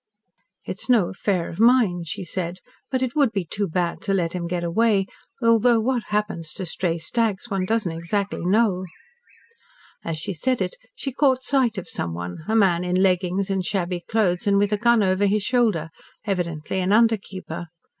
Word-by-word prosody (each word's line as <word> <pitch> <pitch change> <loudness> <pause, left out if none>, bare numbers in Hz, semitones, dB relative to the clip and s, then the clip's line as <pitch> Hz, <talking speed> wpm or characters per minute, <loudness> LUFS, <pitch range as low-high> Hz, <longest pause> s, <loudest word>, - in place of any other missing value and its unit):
"It - - -5
is - - -8
no 225 -8 +4
affair 190 -3 -1
of 170 - -8
mine," 225 -8 +4
she 155 +3 -5
said, 175 0 -4 0.3
"but 260 -1 0
it 255 +2 -2
would 280 -6 +3
be 195 -5 -2
too 200 +4 -2
bad 175 0 -1
to 195 - 0
let 170 -3 0
him 175 -2 -3
get 175 0 -2
away, 195 +3 +2 0.4
though 230 0 +4
what 240 +1 0
happens 210 -7 -2
to 190 - -5
stray 170 0 -1
stags 220 +5 -1
one 190 -2 0
doesn't 220 -3 0
exactly 170 +5 -2
know." 190 -1 +2 1.2
As 165 -1 -3
she 165 +5 -4
said 255 +9 0
it - - -1 0.2
she 275 - -4
caught 260 -1 +2
sight 250 -5 +1
of 185 - -5
someone, 90 - -4
a 220 - +1
man 185 -5 +3
in 180 0 -1
leggings 185 +1 +1
and 190 -1 0
shabby 180 -1 -1
clothes 185 -2 0
and 200 0 +4
with 205 +1 +2
a - - +2
gun 235 0 +4
over 190 +1 +2
his 205 +1 +1
shoulder, 215 -10 +1 0.3
evidently 175 -4 -2
an 185 +1 0
under 225 +1 +5
keeper. 185 -3 -8
195 Hz, 185 wpm, -23 LUFS, 175-225 Hz, 1.2 s, under